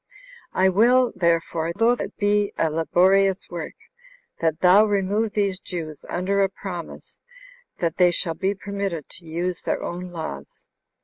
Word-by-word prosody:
I 190 - +3
will, 240 +6 +4
therefore, 170 -1 0
though 230 +3 +4
it 245 - -3
be 205 0 +1
a 160 - +1
laborious 190 +5 +2
work, 170 -2 -6 0.6
that 160 -1 0
thou 185 +3 +7
remove 205 +1 0
these 200 -3 0
Jews, 160 -7 -7
under 195 +3 0
a 195 - +3
promise, 180 -3 -8 0.6
that 165 -1 -2
they 180 -1 +6
shall 170 -1 -1
be 195 +4 -1
permitted 200 -5 -4
to 170 - -12
use 170 +2 -3
their - - -2
own 180 +1 -5
laws. 70 - -8
185 Hz, 145 wpm, -23 LUFS, 170-200 Hz, 0.6 s, thou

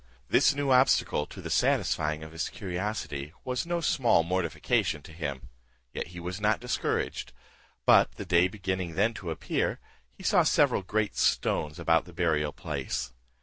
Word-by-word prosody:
This 145 - +4
new 145 -1 0
obstacle 125 - +3
to - - -10
the - - -5
satisfying 75 0 +1
of 80 - -9
his 80 +3 -3
curiosity 90 -6 -4
was 125 +4 -2
no 170 0 -1
small 120 - +3
mortification 85 -3 0
to - - -12
him, 70 -7 -5 0.4
yet - - -4
he 90 +1 -9
was 90 +4 -5
not 105 +1 +2
discouraged, 125 +1 -2 0.5
but - - +5
the - - -7
day 90 0 +4
beginning 95 -4 -3
then 110 +6 +2
to 90 -6 -7
appear, 80 - -1 0.3
he - - -15
saw - - +4
several - - +3
great 105 +3 -1
stones 75 +1 +1
about 80 -1 +2
the 90 - -13
burial 80 -4 +1
place. 65 -2 -4
90 Hz, 160 wpm, -28 LUFS, 80-105 Hz, 0.5 s, but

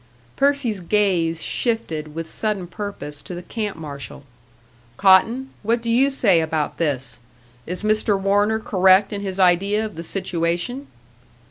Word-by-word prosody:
Percy's 275 -7 +1
gaze 175 -4 +1
shifted 160 -11 -2
with 165 0 -4
sudden 210 0 -2
purpose 175 -5 -6
to 180 - -7
the 175 - -7
camp 210 -1 -4
marshal. 145 -2 -8 0.7
"Cotton, 225 +8 +4
what 230 +3 +1
do 230 0 -3
you 260 +4 +4
say 200 -11 +3
about 155 -2 -2
this? 135 -7 -1 0.5
Is 180 +4 -4
Mr. 215 -1 +2
Warner 205 +3 +2
correct 190 -1 +4
in 200 - -4
his 190 -2 -4
idea 195 +4 +3
of 215 - -7
the 165 - -7
situation?" 175 - -2
195 Hz, 140 wpm, -21 LUFS, 170-215 Hz, 0.7 s, Cotton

